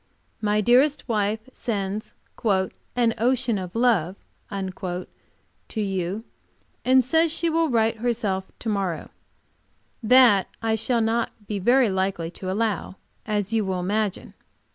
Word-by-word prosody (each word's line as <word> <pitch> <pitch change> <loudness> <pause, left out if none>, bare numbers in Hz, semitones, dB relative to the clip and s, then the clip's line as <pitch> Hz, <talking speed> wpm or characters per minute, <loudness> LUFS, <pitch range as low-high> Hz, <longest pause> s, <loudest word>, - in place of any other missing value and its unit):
My 210 0 +2
dearest 260 +7 +3
wife 215 -1 0
sends 205 -2 -3 0.3
"an 225 +3 0
ocean 245 -2 +2
of 185 +1 -7
love" 220 -7 +2 0.3
to 185 -2 -4 0.8
you, 195 0 -2 0.6
and 260 -1 +4
says 320 +4 +3
she 335 +1 0
will 325 0 +2
write 225 -2 +2
her 240 +2 0
self 190 -4 -2
to - - -8
morrow. 190 -6 -2 0.9
That 230 -4 +6
I 225 -1 0
shall 230 +2 +1
not 225 -1 -1
be 205 -1 -3
very 245 +4 +4
likely 190 -3 -1
to 185 +1 -6
allow, 205 -2 -1 0.3
as 210 0 -1
you 220 -1 +2
will 190 -2 -2
imagine. 205 +2 -2
215 Hz, 130 wpm, -24 LUFS, 190-240 Hz, 0.9 s, That